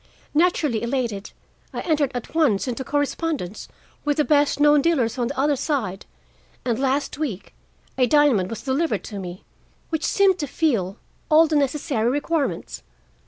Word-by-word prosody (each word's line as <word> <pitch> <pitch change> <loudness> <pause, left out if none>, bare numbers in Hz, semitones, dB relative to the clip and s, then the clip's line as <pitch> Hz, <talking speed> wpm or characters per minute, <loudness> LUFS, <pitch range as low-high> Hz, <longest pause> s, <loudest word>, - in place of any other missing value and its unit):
Naturally 300 -7 +2
elated, 235 -4 -2 0.4
I - - -4
entered 305 -5 +1
at 245 - -6
once 275 -10 +2
into 250 +1 -3
correspondence 290 - -2 0.4
with 295 -1 0
the 300 - +4
best 290 -1 +2
known 295 0 +5
dealers 265 -8 +1
on 240 - +1
the 275 +1 -4
other 290 +1 +3
side, 245 - -2 0.6
and 235 -2 0
last 275 +2 0
week 235 -12 -4 0.5
a 250 - +4
diamond 255 -9 +3
was 225 -1 -6
delivered 285 +5 0
to 205 -3 -7
me 180 -1 -7 0.5
which 320 -1 -1
seemed 390 -2 +3
to 295 - -2
fill 230 - 0 0.3
all 315 +1 +7
the 315 -1 -1
necessary 275 -4 +1
requirements. 290 +2 -2
280 Hz, 155 wpm, -23 LUFS, 230-300 Hz, 0.6 s, all